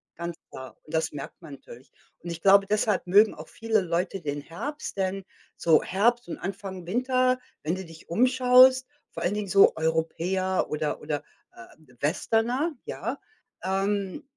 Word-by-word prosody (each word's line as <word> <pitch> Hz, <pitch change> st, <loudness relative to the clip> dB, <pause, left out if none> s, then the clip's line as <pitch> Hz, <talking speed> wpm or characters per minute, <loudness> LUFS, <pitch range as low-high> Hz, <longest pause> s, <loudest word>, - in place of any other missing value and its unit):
Ganz 170 Hz, 0 st, -5 dB, 0.2 s
klar. 130 Hz, 0 st, -10 dB
Und 155 Hz, -, -15 dB
das 160 Hz, 0 st, 0 dB
merkt 140 Hz, +3 st, -8 dB
man 155 Hz, -4 st, -10 dB
natürlich. 130 Hz, 0 st, -15 dB, 0.3 s
Und 175 Hz, -, -8 dB
ich 165 Hz, -, -7 dB
glaube, 195 Hz, +1 st, +6 dB
deshalb 210 Hz, -2 st, 0 dB
mögen 205 Hz, +4 st, +5 dB
auch 155 Hz, +1 st, -10 dB
viele 225 Hz, -2 st, 0 dB
Leute 180 Hz, +2 st, -2 dB
den 145 Hz, -1 st, -4 dB
Herbst, 240 Hz, -, -6 dB
denn 190 Hz, 0 st, -1 dB, 0.3 s
so 160 Hz, -2 st, +4 dB
Herbst 235 Hz, +5 st, +1 dB
und -, -, -5 dB
Anfang 190 Hz, -1 st, -6 dB
Winter, 255 Hz, +3 st, +1 dB, 0.2 s
wenn 160 Hz, +4 st, -1 dB
du 190 Hz, 0 st, -7 dB
dich 165 Hz, -1 st, -15 dB
umschaust, 255 Hz, +4 st, +5 dB, 0.2 s
vor -, -, -6 dB
allen 175 Hz, +4 st, +1 dB
Dingen 210 Hz, -1 st, -3 dB
so 195 Hz, +1 st, +5 dB
Europäer 165 Hz, +4 st, 0 dB
oder 150 Hz, -1 st, -2 dB
oder, 150 Hz, -1 st, -3 dB, 0.3 s
äh, 115 Hz, -, -11 dB, 0.4 s
Westerner, 235 Hz, -, 0 dB
ja, 235 Hz, +7 st, -4 dB, 0.4 s
ähm, 195 Hz, 0 st, -1 dB
190 Hz, 160 wpm, -26 LUFS, 165-225 Hz, 0.4 s, glaube